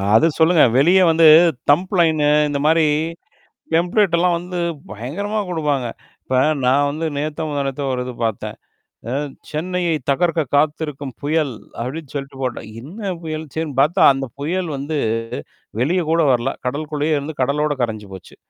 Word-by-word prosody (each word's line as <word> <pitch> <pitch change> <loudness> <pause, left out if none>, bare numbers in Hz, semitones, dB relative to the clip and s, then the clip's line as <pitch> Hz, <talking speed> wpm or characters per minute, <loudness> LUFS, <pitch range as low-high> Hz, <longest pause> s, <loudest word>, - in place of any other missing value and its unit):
அத 155 - +6
சொல்லுங்க. 160 0 +5
வெளியே 180 +7 +5
வந்து 160 0 +5 0.4
தம்ப்லைனு 160 -2 +3 0.2
இந்த 140 -1 -2
மாரி 160 0 +4 1.0
எம்ப்ளடலாம் 180 -2 +2
வந்து 180 +1 -6 0.3
பயங்கரமா 170 - -3
குடுப்பாங்க. 150 -6 -1 0.4
இப்ப 130 -1 0 0.3
நான் 140 +3 +3
வந்து 160 +2 -3
நேத்தோ, 155 +2 -3
முந்தா 145 -1 -2
நேத்தோ 140 +1 -4
ஒரு 125 0 -2
இது 125 - -6
பார்த்தேன். 110 -3 -3 0.5
அ - - -3 0.4
சென்னையை 175 +1 -1 0.2
தகர்க்க 165 +2 +1
காத்திருக்கும் 145 -2 -1
புயல் 150 -2 0 0.3
அப்படின்னு 140 +4 -5
சொல்லிட்டு 135 -1 -6
போட்டான். 120 -4 -4
என்ன 195 - -6
புயல் 155 -1 -4
சரின்னு 160 -4 -4
பார்த்தா 165 +7 +3
அந்த 135 0 -3
புயல் 175 +4 -2
வந்து 145 +2 -3 0.8
வெளிய 175 +7 +1
கூட 165 +1 +3
வரல. 120 +2 0
கடலுக்குள்ளேயே 150 +2 -1
இருந்து 145 +2 -6
கடலோட 150 +3 +1
கரைஞ்சு 110 -3 -3
போச்சு. 95 -2 -13
150 Hz, 140 wpm, -20 LUFS, 140-165 Hz, 1.0 s, அத